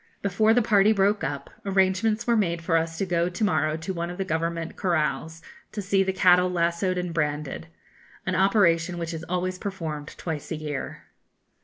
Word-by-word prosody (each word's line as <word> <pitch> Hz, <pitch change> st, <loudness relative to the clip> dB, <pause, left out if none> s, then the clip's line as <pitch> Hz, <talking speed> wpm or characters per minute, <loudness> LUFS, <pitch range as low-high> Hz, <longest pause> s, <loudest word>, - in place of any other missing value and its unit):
Before 205 Hz, +3 st, +3 dB
the 240 Hz, +1 st, +4 dB
party 210 Hz, -1 st, +4 dB
broke 205 Hz, +1 st, +2 dB
up, 140 Hz, -1 st, -4 dB
arrangements 195 Hz, +3 st, +1 dB
were 235 Hz, -, +3 dB
made 170 Hz, -6 st, 0 dB
for 165 Hz, 0 st, +1 dB
us 165 Hz, 0 st, 0 dB
to 195 Hz, -, 0 dB
go 175 Hz, -1 st, +1 dB
to 180 Hz, +5 st, -4 dB
morrow 155 Hz, -5 st, +1 dB
to 170 Hz, +4 st, -4 dB
one 170 Hz, -1 st, -3 dB
of 175 Hz, -, -7 dB
the 195 Hz, -, -2 dB
Government 165 Hz, 0 st, -2 dB
corrals, 160 Hz, -2 st, -1 dB, 0.3 s
to 215 Hz, -, -4 dB
see 195 Hz, 0 st, +1 dB
the 190 Hz, 0 st, +1 dB
cattle 180 Hz, -1 st, +4 dB
lassoed 170 Hz, +1 st, 0 dB
and 180 Hz, -1 st, -3 dB
branded 150 Hz, -1 st, -2 dB, 0.6 s
an 185 Hz, -, -1 dB
operation 180 Hz, -3 st, +3 dB
which 170 Hz, 0 st, -4 dB
is 165 Hz, 0 st, -6 dB
always 180 Hz, +1 st, -2 dB
performed 160 Hz, -7 st, -5 dB
twice 160 Hz, -4 st, -5 dB
a -, -, -2 dB
year. 150 Hz, -3 st, -5 dB
180 Hz, 185 wpm, -25 LUFS, 165-195 Hz, 0.6 s, the